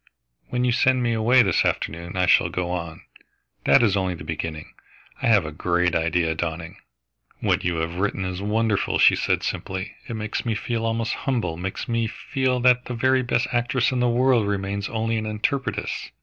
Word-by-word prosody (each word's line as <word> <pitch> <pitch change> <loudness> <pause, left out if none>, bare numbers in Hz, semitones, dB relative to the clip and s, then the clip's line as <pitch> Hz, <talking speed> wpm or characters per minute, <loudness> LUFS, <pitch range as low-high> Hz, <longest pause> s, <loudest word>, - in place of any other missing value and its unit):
When 125 0 0
you 125 - +2
send 130 +1 +2
me 120 -1 +1
away 120 +3 +4
this 95 -5 +2
afternoon, 85 +3 -2
I 90 - +3
shall 85 - +4
go 90 0 -3
on. 85 -3 -5 0.6
That - - +6
is 100 -4 +3
only 95 -2 0
the - - -9
beginning. 80 -2 -5 0.5
I - - +1
have 105 -7 +4
a 75 - -5
great 90 +3 0
idea 80 0 +1
dawning." 80 0 -5 0.6
"What - - +1
you 85 -1 0
have 80 +1 -3
written 95 -1 -1
is 90 0 -4
wonderful," 105 0 0
she - - +6
said - - 0
simply. 95 +1 -4
"It 115 - -5
makes 110 -1 -3
me 115 -3 -1
feel 115 +1 -2
almost 115 0 -1
humble, 115 -12 -2
makes 95 +3 -5
me 115 -2 0
feel 130 +2 -1
that 125 0 +4
the 125 - -5
very 130 +2 +2
best 120 -1 0
actress 120 +1 +1
in 130 - -1
the 125 0 +2
world 120 -2 +3
remains 100 0 -2
only 115 0 -1
an 110 0 -3
interpretress. 110 +5 -2
105 Hz, 190 wpm, -23 LUFS, 90-120 Hz, 0.6 s, That